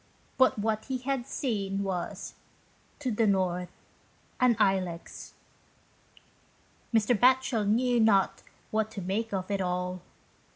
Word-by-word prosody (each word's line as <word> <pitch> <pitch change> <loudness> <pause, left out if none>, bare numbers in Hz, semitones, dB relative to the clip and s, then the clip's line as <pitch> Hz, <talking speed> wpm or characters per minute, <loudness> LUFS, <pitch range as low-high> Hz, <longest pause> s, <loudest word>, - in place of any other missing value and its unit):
But 260 - +5
what 215 +1 -1
he 265 -1 -2
had 255 0 -3
seen 200 -9 -2
was 185 -3 -4 0.3
" - - -35
to 255 -3 -1
the 220 0 +2
north, 180 -2 0 0.7
an 250 -2 +4
Ilex." 185 -3 -1 1.6
Mr. 225 +1 +3
Batchel 250 -2 +3
knew 240 +3 +2
not 205 -4 +3 0.3
what 220 0 0
to 220 -3 -7
make 215 +5 -2
of 190 0 -3
it 200 -1 0
all. 180 0 -2
210 Hz, 125 wpm, -29 LUFS, 190-240 Hz, 1.6 s, But